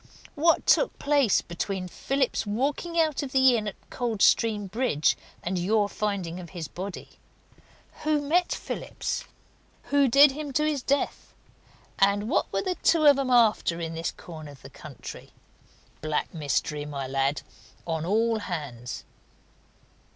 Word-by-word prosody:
What 330 +2 +3
took - - +3
place 285 -7 +3
between 185 +2 -4
Phillips's 265 +4 -1
walking 285 +10 -1
out 315 -3 +2
of 275 -2 -6
that - - +2
inn 245 -5 +4
at 205 - -4 0.2
Coldstream 225 -2 +2
Bridge 210 - +1 0.3
and 180 +1 -1
your 205 +3 +2
finding 200 -5 -3
of 175 -2 -9
his 160 -3 -4
body? 190 +5 -8 0.8
Who 305 -1 +2
met 335 +5 +1
Phillips? - - -4 0.7
Who 285 -1 +5
did 275 +3 +7
him 290 0 -6
to 300 - +2
his 300 -3 0
death? 280 +3 -2 0.6
And 200 +2 +3
what 280 - 0
were - - -1
the 370 -2 -2
two 325 -2 +3
of 285 -2 +7
'em 270 -2 -1
after 220 -8 +3
in 165 -1 -4
this 165 +1 -2
corner 155 -3 -10
of 135 - -18
the 135 - -11
country? 140 0 -10 0.7
Black 155 -1 -2
mystery, 150 -1 -1
my 145 -2 -5
lad, 135 +2 0 0.4
on 160 -2 -2
all 220 +5 +1
hands!" 140 - -6
210 Hz, 145 wpm, -26 LUFS, 165-275 Hz, 0.8 s, did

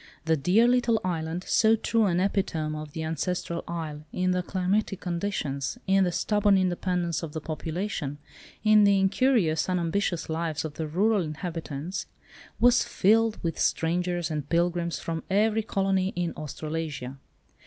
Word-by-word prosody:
The 160 0 +3
dear 180 +11 +4
little 245 -2 +3
island, 165 0 -2
so 220 0 +4
true 225 0 +1
an 175 -1 +1
epitome 180 -6 -1
of 150 -1 -7
the 160 - -4
ancestral 170 +2 -2
isle 155 -3 -5
in 185 0 0
the 180 0 +1
climatic 190 +2 -1
conditions, 170 -6 -3
in 195 0 +4
the 175 - 0
stubborn 205 +2 +2
independence 180 -2 0
of 160 -3 -6
the 160 - -3
population, 160 -1 -4 0.5
in 215 -1 +6
the 200 -1 +5
incurious, 190 - +2
unambitious 175 0 0
lives 160 -1 -2
of 155 - -5
the 155 +1 -4
rural 200 +6 +2
inhabitants, 160 0 -5 0.5
was 245 +1 +5
filled 220 +2 +2
with 165 -1 -2
strangers 175 0 0
and 150 -2 -4
pilgrims 170 0 +1
from 165 -1 -4
every 215 +3 +2
colony 195 -2 0
in 175 -1 -1
Australasia. 150 -3 -5
175 Hz, 145 wpm, -27 LUFS, 160-195 Hz, 0.5 s, in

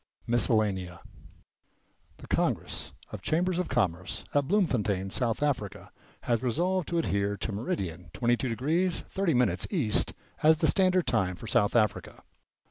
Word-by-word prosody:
v. - - -5
MISCELLANEA 100 -7 +1 1.2
The - - -12
Congress - - -1 0.2
of - - -7
Chambers 180 +2 +1
of 180 - -2
Commerce 90 -8 -1
at 145 -1 +2
Bloemfontein, 105 - +1
South 120 +3 0
Africa, 125 -9 -2 0.3
has 115 -2 0
resolved 175 +8 0
to 170 - -1
adhere 100 -9 0
to 105 - -3
meridian 95 - -4
22° 120 +2 +1 0.6
."0' 125 - +1
east 140 - +1 0.3
as 155 +1 +6
the - - +1
standard 185 -3 +3
time 90 -6 +1
for 90 - -10
South 115 -2 +2
Africa. 105 -3 0
120 Hz, 130 wpm, -29 LUFS, 100-160 Hz, 1.2 s, as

